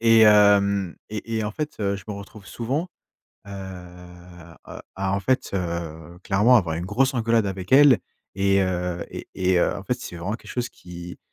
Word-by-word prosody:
et 115 -1 +6
hem 100 -3 +5
et 110 +1 -4
et 110 - -1
en 105 - -2
fait, 150 +5 -4
heu, 100 -1 0
je 95 - -11
me 105 - -4
retrouve 100 0 -11
souvent, 135 +9 -3 0.6
heu - - -10
heu, 90 -2 -11 0.2
à 95 0 -1
en 100 - -1
fait, 130 +6 0
heu, 85 -2 -4
clairement 105 +6 +5
avoir 85 -7 +1
une 85 - -4
grosse 130 +7 +1
engueulade 115 -2 +2
avec 95 -2 -5
elle 140 -2 +7 0.4
et 100 0 +2
heu 90 -1 -2
et - - -8
et 95 -1 +2
heu, - - +1
en 100 - -7
fait, 125 - 0
c'est 90 - -7
vraiment 95 +6 -3
quelque - - -13
chose 120 -1 -2
qui, 90 0 -10
100 Hz, 190 wpm, -24 LUFS, 90-110 Hz, 0.6 s, elle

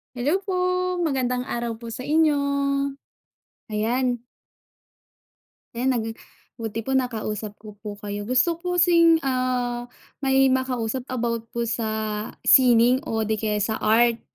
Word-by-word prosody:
Hello 285 +9 +1
po. 385 - -2 0.5
Magandang 255 -6 0
araw 235 -2 -3
po 230 +1 -9
sa 255 +3 -6
inyo. 305 -1 +3 1.3
Ayan. 240 +4 0 1.6
Ayan. 250 +3 0
Nag 220 - -2 0.5
buti 225 -1 -5
po 265 - -1
nakausap 220 -5 -2
ko 210 -1 -12
po 205 -1 -7
kayo. 205 +1 -6
Gusto 255 +7 +3
ko - - -11
po 360 - -6
kasing, 335 -2 +5
ah, 250 -2 -1 0.3
may 270 0 +4
makausap 255 -2 -1
about 230 -2 -2
po 235 0 -2
sa 220 -2 -2 0.2
sining 250 0 +6
o 220 -1 0
'di 215 0 -1
kaya 210 -1 0
sa 220 +1 -1
art. 230 +1 +3
240 Hz, 135 wpm, -24 LUFS, 220-260 Hz, 1.6 s, sining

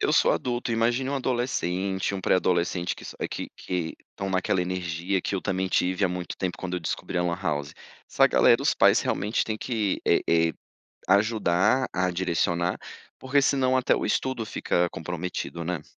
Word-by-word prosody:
eu - - +1
sou - - +4
adulto, 120 -1 -2
imagine 120 +4 +1
um 140 - -1
adolescente, 100 -8 -1
um 95 - -3
pré-adolescente 90 -1 +1
que - - -12
s - - -8 0.2
que - - -5
que 90 -3 -3 0.2
estão 95 0 -5
naquela 95 0 +1
energia, 90 +1 -2
que 100 - -3
eu 95 - -1
também 95 -1 -1
tive 90 +2 +1
há 95 - +2
muito 90 -1 -5
tempo 90 -2 -3
quando 90 -1 -4
eu 90 - -2
descobri 80 - -4
a - - +2
lan 85 0 -1
house. 75 -5 -2 0.4
Essa - - +5
galera, - - +4
os - - +2
pais - - +5
realmente 105 +3 0
têm 110 -1 -3
que, 110 -5 -1
eh - - +4
eh, 80 -1 +3 0.6
ajudar 105 +3 +3
a 90 0 +1
direcionar, 85 -1 0 0.4
porque 140 +2 +2
senão 130 -2 +2
até 130 - +3
o - - -2
estudo 130 -4 -1
fica 90 -3 0
comprometido, 85 +1 -5
né? 85 0 -3
95 Hz, 180 wpm, -26 LUFS, 90-110 Hz, 0.6 s, Essa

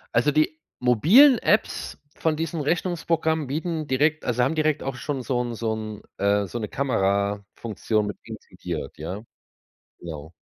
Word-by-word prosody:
Also, 145 +6 +4
die 155 +1 +1 0.2
mobilen 185 - +6
Apps 210 - 0 0.2
von 160 -1 0
diesen 165 0 -3
Rechnungsprogrammen 165 -1 0
bieten 155 +2 -2
direkt 150 +4 +1
also 125 0 +1
haben 135 +6 +1
direkt 155 -1 +1
auch 135 -1 -3
schon 135 +1 -3
so 125 0 -1
'n 120 -1 -4
so 115 -1 -1
'n 110 -1 -6 0.2
äh, 100 0 +2
so 120 - -5
'ne 105 - -3
Kamerafunktion 105 -2 -1
mit 105 - -5
integriert, - - -7
ja? 90 +7 -5 0.8
Genau. 80 -2 -8
130 Hz, 150 wpm, -25 LUFS, 105-155 Hz, 0.8 s, mobilen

